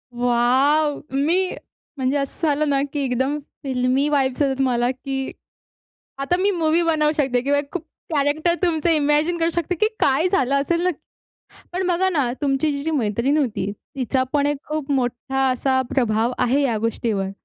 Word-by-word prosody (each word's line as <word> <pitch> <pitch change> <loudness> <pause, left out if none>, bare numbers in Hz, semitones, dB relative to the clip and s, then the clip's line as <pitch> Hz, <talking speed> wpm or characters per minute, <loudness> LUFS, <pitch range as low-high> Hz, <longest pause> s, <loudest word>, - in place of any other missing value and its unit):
Wow! 260 +5 +2
मी 335 +7 +2 0.5
म्हणजे 265 +1 0
असं 280 +3 -2
झालं 300 0 +1
ना, 275 -1 +2
की 295 - -2
एकदम 265 +3 0 0.3
फिल्मी 260 +1 +1
वाईब्स 270 -2 +1
येत 285 - +4
आहेत 270 0 -1
मला, 245 -1 +1
की 270 +1 -4 0.9
आता 275 +6 0
मी 400 +2 +2
मूवी 330 -2 +2
बनवू 310 -2 +2
शकते 265 -4 +1
किंवा 285 +3 +1
एक 285 0 -7
खूप 360 - -3 0.3
कॅरेक्टर 295 +4 +2
तुमचं 335 -2 +1
इमॅजिन 305 +2 +2
करू 330 0 +1
शकते 345 +1 -1
की 430 +6 +2
काय 280 +6 +3
झालं 275 -7 +1
असेल 335 +4 0
नक 365 - +1 0.8
पण 370 +1 -1
बघा 365 +1 +2
ना, 285 -9 0
तुमची 280 +1 +1
जी 280 -1 -3
जी 320 - -1
मैत्रीण 250 +1 +1
होती, 220 -8 -1 0.2
तिचा 260 0 0
पण 285 -1 +2
एक 290 0 0
खूप 300 -2 -3
मोठा 265 0 0
असा 260 +1 +1
प्रभाव 230 -2 +1
आहे 255 +3 +2
या 245 -6 +1
गोष्टीवर. 215 -3 -1
280 Hz, 170 wpm, -22 LUFS, 255-310 Hz, 0.9 s, येत